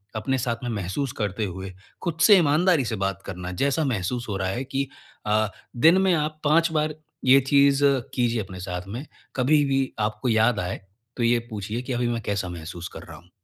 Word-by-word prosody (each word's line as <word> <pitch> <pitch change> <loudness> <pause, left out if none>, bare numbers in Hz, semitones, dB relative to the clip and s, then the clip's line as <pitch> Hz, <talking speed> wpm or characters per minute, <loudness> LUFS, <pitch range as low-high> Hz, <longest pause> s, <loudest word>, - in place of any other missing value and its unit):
अपने 130 +5 0
साथ 120 -1 -1
में 120 - -2
महसूस 110 +6 -2
करते 105 +1 -1
हुए, 95 0 -6 0.3
खुद 170 -3 -3
से 205 -3 +8
ईमानदारी 160 -2 +3
से 110 - -2
बात 95 0 -2
करना। 90 -1 -6
जैसा 140 +3 +2
महसूस 120 0 -2
हो 100 - -2
रहा 95 -1 -1
है 120 +7 -2
कि 135 +1 -2 0.4
अ 110 +1 +2 0.3
दिन, 165 +9 +6
में 190 -1 +3
आप 155 -1 -1
5 165 +2 +3
बार 155 -1 0 0.3
ये 130 +2 +7
चीज़ 140 +1 +4 0.3
कीजिए 120 -2 +1
अपने 95 -2 -8
साथ 90 0 -5
में। 120 +9 -6 0.3
कभी 145 +3 +3
भी 135 -1 +1 0.2
आपको 110 +4 -1
याद 110 0 +3
आए, 90 +3 -3 0.4
तो 120 - 0
ये 120 +1 +4
पूछिए 105 +2 -4
कि, 130 0 -4
"अभी 120 0 0
मैं 120 -1 -1
कैसा 100 -3 -2
महसूस 85 0 -7
कर - - -9
रहा 80 -2 -11
हूँ?" 85 +2 -19
120 Hz, 205 wpm, -25 LUFS, 95-140 Hz, 0.4 s, से